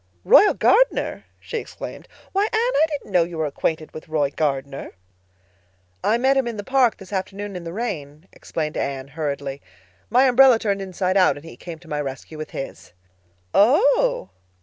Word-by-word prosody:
"Royal 415 - +7
Gardner!" - - +2
she 470 - -5
exclaimed. - - -9 0.2
"Why, 395 +2 +2
Anne, - - -2
I 445 -8 +3
didn't 290 -8 -6
know 180 -2 +4
you 170 0 -7
were 160 - 0
acquainted 155 +2 -2
with 155 - -10
Roy 145 -3 +1
Gardner!" 140 -2 -3 1.1
"I 225 - +3
met 265 +3 +3
him 265 -2 +1
in 230 -2 -4
the 205 - -5
park 260 -1 +2
this 195 0 -12
afternoon 200 +1 -4
in 175 -1 -6
the 165 - -5
rain," 170 -7 -5
explained 155 -2 -4
Anne 135 -1 -3
hurriedly. 140 -2 -4 0.5
"My 250 +4 +5
umbrella 260 -1 +6
turned 200 -3 -1
inside 185 0 -1
out 185 - +4
and 145 - -11
he 165 - -10
came 170 -2 -9
to 170 +1 -19
my 150 -1 -2
rescue 140 +3 -7
with 155 - -6
his." 135 - -8 0.6
"Oh!" - - +3
185 Hz, 175 wpm, -22 LUFS, 155-250 Hz, 1.1 s, Royal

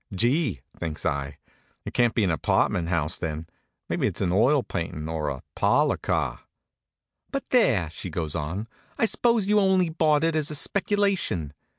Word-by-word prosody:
"Gee!" 120 - +1 0.2
thinks 80 -2 -4
I. 70 -1 -2 0.5
"It - - -6
can't 120 -2 +2
be 115 - +2
an 95 - +2
apartment 85 +2 +1
house, 85 -2 -1
then. 80 -1 -4 0.4
Maybe - - 0
it's - - -4
an 90 - 0
oil 125 +8 +4
paintin', 80 -5 -4
or 80 -2 -2
a 65 -3 -6
parlor - - +2
car." - - -1 0.9
"But 275 - -5
there!" 130 - +4
she 90 - -6
goes 80 -2 -3
on. 85 +8 -3 0.3
"I - - +3
suppose 230 -1 +2
you 210 +1 +4
only 190 -3 +3
bought 155 -2 +2
it 165 -1 +2
as 155 -2 0
a 150 - -3
speculation. 195 - 0
105 Hz, 170 wpm, -26 LUFS, -, 0.9 s, oil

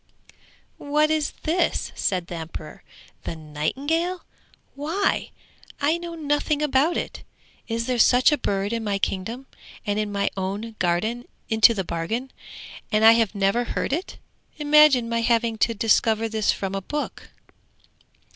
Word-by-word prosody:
'What 300 +2 +1
is 310 -2 +1
this?' 345 +3 0
said 185 -3 -1
the 175 - -9
emperor. 160 -2 -8 0.4
'The - - -4
nightingale? 275 - -2 0.5
Why, 325 +8 -1 0.5
I 310 +4 +1
know 340 -1 -7
nothing 295 -1 0
about 295 +3 +2
it. - - -5 0.5
Is 230 0 -2
there 250 -1 -1
such 250 +4 +5
a 295 - +2
bird 200 -1 -1
in 230 -1 -2
my 205 -2 0
kingdom, 220 +7 -3 0.4
and 205 -1 0
in 210 -1 -2
my 200 0 0
own 200 +4 -4
garden 200 +8 -1 0.2
into 220 +1 +5
the 190 - -1
bargain, 200 +11 -3 0.6
and 215 +1 +3
I 225 - +10
have 225 -2 +2
never 200 +4 +2
heard 245 - -2
of 315 - +2
it? 375 - -12 0.4
Imagine 295 -5 +5
my 230 0 0
having 230 -1 +1
to 230 +1 +2
discover 225 0 +2
this 220 -1 +1
from 195 -1 -4
a 195 - -2
book?' 295 +10 -5
230 Hz, 150 wpm, -24 LUFS, 200-290 Hz, 0.6 s, I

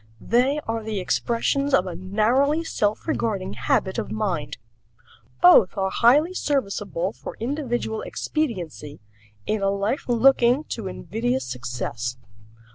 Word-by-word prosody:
They 255 - +2
are 225 0 -1
the 215 -2 -3
expressions 270 +8 +1
of 185 - +2
a 180 - -5
narrowly 240 - +1
self 210 -7 -1
regarding 215 -11 -1
habit 190 -1 0
of - - -4
mind. 175 -10 -2 0.9
Both 185 +3 +7
are 190 -1 0
highly 290 - +4
serviceable 200 - -1
for - - -9
individual 240 -3 -2
expediency 180 - -4 0.5
in 215 -1 -1
a 195 - +2
life 200 +7 -2
looking 245 +2 +4
to 220 -4 -4
invidious 240 +7 -2
success. 125 -1 -4
220 Hz, 120 wpm, -24 LUFS, 190-260 Hz, 0.9 s, Both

